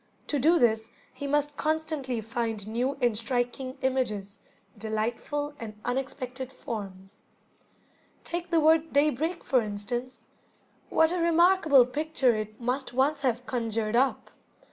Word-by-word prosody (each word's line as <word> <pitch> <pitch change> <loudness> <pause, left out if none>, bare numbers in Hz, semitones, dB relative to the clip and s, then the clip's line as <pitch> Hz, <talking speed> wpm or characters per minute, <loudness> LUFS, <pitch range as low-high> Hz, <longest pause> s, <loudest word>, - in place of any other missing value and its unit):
To 290 - +1
do 325 +6 +5
this 225 -5 +2 0.2
he 285 - -5
must 290 0 0
constantly 310 -6 -1
find 225 -2 -3
new 250 +5 -1
and 240 -3 +3
striking 245 +2 -2
images, 215 -7 -1 0.4
delightful 230 +7 -2
and 215 -2 -8
unexpected 255 0 -3
forms. 195 -5 -7 1.0
Take 345 +1 -4
the 335 -1 +3
word 320 +1 +3
"daybreak", 305 +4 +1
for 255 -3 +3
instance. 220 +4 -5 0.6
What 320 0 +4
a 360 - -1
remarkable 335 -5 +5
picture 270 -2 +1
it 215 0 -5
must 250 +2 -2
once 280 +3 +2
have 250 -2 0
conjured 225 -3 -1
up! 265 +2 +1
255 Hz, 125 wpm, -28 LUFS, 225-295 Hz, 1.0 s, do